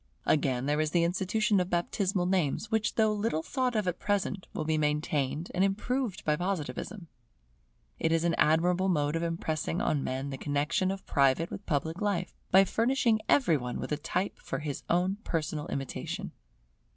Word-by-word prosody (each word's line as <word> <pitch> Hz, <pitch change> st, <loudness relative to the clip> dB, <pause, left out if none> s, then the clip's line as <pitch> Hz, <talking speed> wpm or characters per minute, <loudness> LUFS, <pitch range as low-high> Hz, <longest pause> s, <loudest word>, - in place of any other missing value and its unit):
Again 130 Hz, -4 st, +2 dB
there 150 Hz, +2 st, +1 dB
is 155 Hz, -, 0 dB
the 170 Hz, +1 st, +2 dB
institution 190 Hz, +4 st, +1 dB
of 180 Hz, 0 st, -1 dB
baptismal 180 Hz, +2 st, 0 dB
names, 185 Hz, -, 0 dB
which 220 Hz, -1 st, +1 dB
though 220 Hz, -1 st, +3 dB
little 205 Hz, -7 st, -1 dB
thought 255 Hz, +1 st, -1 dB
of 210 Hz, -3 st, 0 dB
at 180 Hz, 0 st, -1 dB
present, 200 Hz, -1 st, -1 dB
will 155 Hz, -, -3 dB
be 160 Hz, 0 st, +1 dB
maintained 150 Hz, 0 st, 0 dB
and 185 Hz, -, +2 dB
improved 210 Hz, +2 st, -1 dB
by 150 Hz, -, +3 dB
Positivism. 180 Hz, +2 st, -3 dB, 0.9 s
It 160 Hz, -, +1 dB
is 165 Hz, 0 st, +2 dB
an 170 Hz, -1 st, +2 dB
admirable 175 Hz, +4 st, +3 dB
mode 150 Hz, -3 st, +1 dB
of 165 Hz, -, 0 dB
impressing 165 Hz, -1 st, -2 dB
on 145 Hz, -3 st, +1 dB
men 135 Hz, +2 st, -3 dB
the 135 Hz, -, -6 dB
connexion 145 Hz, +6 st, 0 dB
of 195 Hz, 0 st, -4 dB
private 140 Hz, +3 st, +2 dB
with 200 Hz, -, -7 dB
public 160 Hz, +3 st, -1 dB
life, 195 Hz, -4 st, -1 dB, 0.2 s
by 190 Hz, +1 st, +7 dB
furnishing 230 Hz, +1 st, +2 dB
every 175 Hz, -, +4 dB
one 125 Hz, -2 st, -4 dB
with -, -, -5 dB
a -, -, +2 dB
type 180 Hz, +6 st, -2 dB
for -, -, -4 dB
his 150 Hz, -3 st, -4 dB
own 180 Hz, +3 st, +2 dB
personal 155 Hz, -2 st, -2 dB
imitation. 135 Hz, -1 st, -4 dB
175 Hz, 175 wpm, -30 LUFS, 150-195 Hz, 0.9 s, by